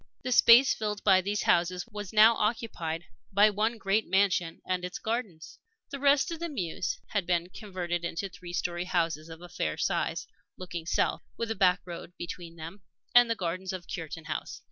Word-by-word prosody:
The 255 - -2
space 245 +2 +7
filled 210 -2 -3
by 190 -2 +5
these 200 +2 -2
houses 175 +1 +2
was 210 -4 -7
now 220 +2 +7
occupied 210 -8 -2 0.3
by 205 +2 +5
one 220 +3 0
great 210 +1 0
mansion 185 -3 +2
and 185 -1 -1
its 180 +1 -4
gardens. 195 -10 -4 0.3
The 280 - -5
rest 280 +4 +3
of 330 - -5
the 340 0 -3
mews 185 - -3
had 200 -5 -1
been 175 -1 0
converted 180 -4 -4
into 170 +3 -3
three 180 -1 -10
story 175 0 -2
houses 165 -3 -1
of 165 +1 -10
a - - -8
fair 75 - -3
size, - - -1 0.3
looking 175 -3 -6
south, - - +1 0.2
with 230 -1 -2
a - - -1
back 180 -2 +3
road 175 0 -8
between 170 -1 -7
them 165 +5 -9 0.3
and 245 -1 +7
the 230 - +1
gardens 185 0 -3
of 180 -2 -6
Cureton 165 -1 -6
House. 155 - -5
185 Hz, 190 wpm, -29 LUFS, 170-215 Hz, 0.3 s, space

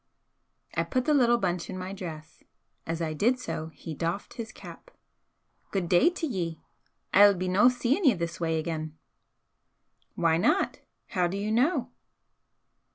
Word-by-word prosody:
I - - +1
put 255 -1 -1
the 305 - +3
little 240 -4 +4
bunch 180 -5 -2
in 190 - -5
my 185 +1 -5
dress. 160 -5 -8 0.5
As 165 +1 -2
I 155 -1 -2
did 235 +11 +2
so, 160 -10 -5
he 160 0 -8
doffed 170 +6 -3
his 225 -2 -6
cap. - - -12 0.8
"Good 190 -3 -1
day 180 - +5
t'ye! 190 - -3 0.5
I'll 200 +1 +7
be 185 +1 -3
no 195 +7 +5
seein' 250 +9 0
ye 255 -7 +6
this 170 -1 -4
way 165 -1 0
again!" 155 -1 -4 1.2
"Why 165 -2 +2
not? 170 - +1 0.3
How 180 -1 +1
do 185 +3 -4
you 210 +2 -2
know?" 255 +10 +1
185 Hz, 155 wpm, -28 LUFS, 165-235 Hz, 1.2 s, I'll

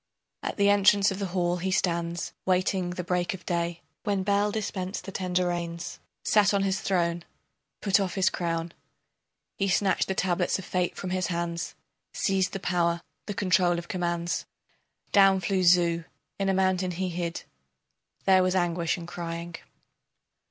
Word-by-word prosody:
At - - -4
the 200 -1 +4
entrance 200 0 +5
of 190 - -4
the 200 - -1
hall 175 -1 0
he 185 +2 -2
stands, 170 -2 -1
waiting 185 0 +1
the 180 0 -4
break 180 +1 0
of 185 - -14
day, 170 -1 -2 0.2
When 200 -2 0
Bel 205 +1 +2
dispensed 195 -3 -3
the 195 - -6
tender 180 -1 0
rains, 170 -1 -4 0.2
Sat 205 -1 +4
on 195 - +2
his 195 -1 0
throne, 170 -2 0 0.6
put 195 -1 +3
off 190 -3 -1
his 190 -2 +3
crown, 165 -1 -2 0.9
He 195 - +2
snatched 195 +1 +2
the 190 - -1
tablets 180 -1 +1
of 190 - -8
fate 180 -1 -1
from 185 - -5
his 185 -1 0
hands, 170 -1 -3 0.4
Seized 190 -2 +1
the 195 - -3
power, 170 -2 0 0.2
the 205 - -3
control 185 -3 +3
of 170 0 -6
commands. 175 -2 -2 0.6
Down 195 -1 +6
flew 185 +1 0
Zu, 170 -2 +4 0.3
in 195 0 +1
a - - +3
mountain 185 -1 +2
he 180 +1 -2
hid. 170 -1 -3 0.8
There 190 -1 +6
was 185 0 +1
anguish 175 -2 +1
and 170 -1 -8
crying. 170 0 -5
180 Hz, 165 wpm, -27 LUFS, 170-190 Hz, 0.9 s, Down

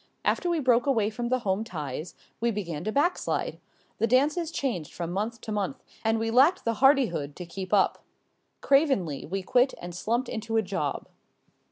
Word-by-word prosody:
After 355 - +1
we 340 -2 +1
broke 250 -2 +3
away 225 -6 +2
from 235 +2 -3
the 255 - +3
home 190 +2 +1
ties 155 - -6 0.2
we 235 - +1
began 175 -8 -3
to 215 - 0
back 295 +9 +2
slide. - - -2 0.4
The 230 - +3
dances 300 +7 +2
changed 240 - -3
from 170 -1 -5
month 215 +5 -2
to 220 - -6
month 210 +6 -2 0.2
and 225 0 +2
we 225 0 -1
lacked 280 +10 +4
the 230 - +2
hardihood 240 - +3
to 180 - -7
keep 185 +2 -7
up. 200 -2 +2 0.6
Cravenly 270 - +2
we 190 +3 -3
quit 250 +7 +3
and 175 0 -7
slumped 235 +8 -1
into 225 0 -2
a 220 - +3
job. 180 -8 -3
225 Hz, 185 wpm, -27 LUFS, 185-260 Hz, 0.6 s, lacked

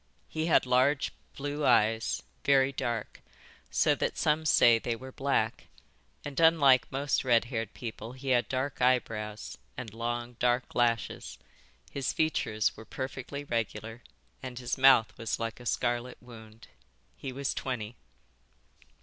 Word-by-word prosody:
He 160 +1 -2
had 165 - +4
large 130 +3 +2 0.3
blue 145 +1 -3
eyes, 115 -2 +2 0.2
very 135 -1 +4
dark, 120 -5 -4 0.5
so - - +3
that - - -2
some 155 +1 +1
say 115 -5 +6
they 115 0 -2
were 130 +3 -10
black, 135 +1 -1 0.6
and 145 -2 -4
unlike 155 -6 +5
most 135 0 0
red 120 -3 +3
haired 115 -3 -4
people 115 0 -7
he 130 +1 -6
had 120 -2 +2
dark 130 +1 -2
eyebrows 110 -4 0 0.2
and 120 -4 -6
long 120 +1 -4
dark 125 0 +1
lashes. 120 -2 0 0.5
His 140 -2 -2
features 110 -9 0
were - - -10
perfectly 135 +3 -6
regular 115 -2 -3 0.4
and 130 -2 -7
his 125 0 -2
mouth 130 -4 +5
was 115 -1 -2
like 115 -1 -4
a 125 - -8
scarlet 120 +1 -1
wound. 110 -2 -14 0.5
He 135 - -6
was 140 +1 -2
twenty." 120 -3 -4
125 Hz, 140 wpm, -29 LUFS, 115-135 Hz, 0.6 s, say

